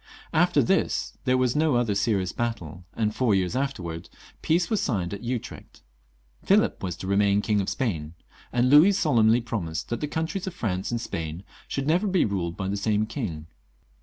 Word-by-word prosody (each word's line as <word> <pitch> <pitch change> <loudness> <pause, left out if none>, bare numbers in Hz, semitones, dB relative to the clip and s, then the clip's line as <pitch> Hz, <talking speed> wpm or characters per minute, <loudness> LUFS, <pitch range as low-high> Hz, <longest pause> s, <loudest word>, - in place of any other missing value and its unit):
After - - +4
tjiis - - 0
there 130 0 +3
was 125 -1 +1
no 155 -3 +2
other 120 -3 +1
serious 100 -2 0
battle, 90 -8 -4
and 110 -1 0
four 120 -6 +2
years 95 +3 0
afterwards 90 -12 -3 0.3
peace 170 +3 +2
was* 220 -3 0
signed 95 -8 -1
at 100 - -6
Utrecht. 120 -1 -6 0.6
Philip - - +2
was 90 -3 -3
to 95 - -7
remain 100 +1 +3
King 105 -2 +1
of 95 - -2
Spain, 85 - -3 0.4
and 125 +1 +2
Louis 155 +8 +7
solemnly 120 - +3
promised 90 -9 -4
that 120 - -3
the 150 - -1
countrie;3 160 +6 -3
of 180 - -5
France 95 -4 -2
and 120 - -1
Spain 80 -5 -5 0.2
should 135 - -3
never 175 +7 +2
be 190 -2 +2
ruled 90 -5 -2
by 95 - -3
the 100 +1 -1
same 105 +1 +1
king. 105 - -5
110 Hz, 185 wpm, -26 LUFS, 95-130 Hz, 0.6 s, Louis